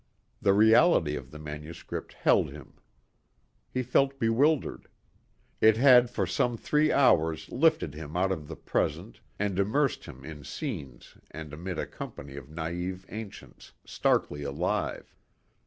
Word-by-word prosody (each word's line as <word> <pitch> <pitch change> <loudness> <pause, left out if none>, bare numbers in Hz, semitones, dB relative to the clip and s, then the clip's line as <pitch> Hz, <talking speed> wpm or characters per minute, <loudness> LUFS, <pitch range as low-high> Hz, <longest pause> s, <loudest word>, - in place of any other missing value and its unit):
The 100 - +4
reality 110 - +5
of 65 -3 -7
the 75 - -10
manuscript 75 +2 -7
held - - +2
him. - - -12 1.0
He 130 - -2
felt 135 +3 +2
bewildered. 135 +5 +1 0.7
It 110 0 +5
had 125 -1 +7
for 100 - -1
some 115 +7 0
three 150 +5 +2
hours 80 - +3
lifted 155 - +2
him 75 +2 -7
out 95 +1 +2
of 75 -6 -4
the - - -7
present - - -2 0.2
and 100 -2 -1
immersed 120 +7 +1
him 65 +1 -11
in 75 -2 -9
scenes 75 - -7
and 75 -2 -9
amid 90 +3 -5
a - - -2
company 70 0 -9
of 70 -1 -9
naive 90 +4 -4
ancients, 110 -1 -10
starkly 75 - 0
alive. 70 +6 -3
95 Hz, 140 wpm, -28 LUFS, 75-120 Hz, 1.0 s, had